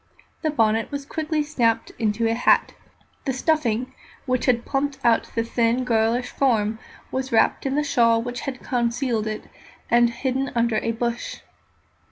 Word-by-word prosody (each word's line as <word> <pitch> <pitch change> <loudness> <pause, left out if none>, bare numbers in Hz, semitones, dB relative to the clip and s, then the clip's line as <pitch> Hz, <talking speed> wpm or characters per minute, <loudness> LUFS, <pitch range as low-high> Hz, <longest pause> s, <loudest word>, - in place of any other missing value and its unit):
The 315 - 0
bonnet 225 -6 +1
was 285 -1 -5
quickly 310 +1 -1
shaped 245 -7 0
into 220 +1 0
a 225 - +1
hat; 235 - +3 0.5
the 270 - 0
stuffing 255 -4 0 0.3
which 255 -2 0
had 240 -2 +2
plumped 275 0 -1
out 230 -1 +3
the 230 - +1
thin, 235 +1 +1
girlish 230 0 +1
form 220 -5 +1 0.3
was 260 0 -3
wrapped 225 +4 +2
in 270 - -1
the 300 - +2
shawl 230 -5 +3
which 245 +1 -4
had 260 -2 -6
concealed 235 -2 0
it, 215 0 -4 0.5
and 240 0 +5
hidden 260 +2 -2
under 235 -1 +2
a 230 - 0
bush. 235 +1 -3
240 Hz, 160 wpm, -23 LUFS, 230-270 Hz, 0.5 s, and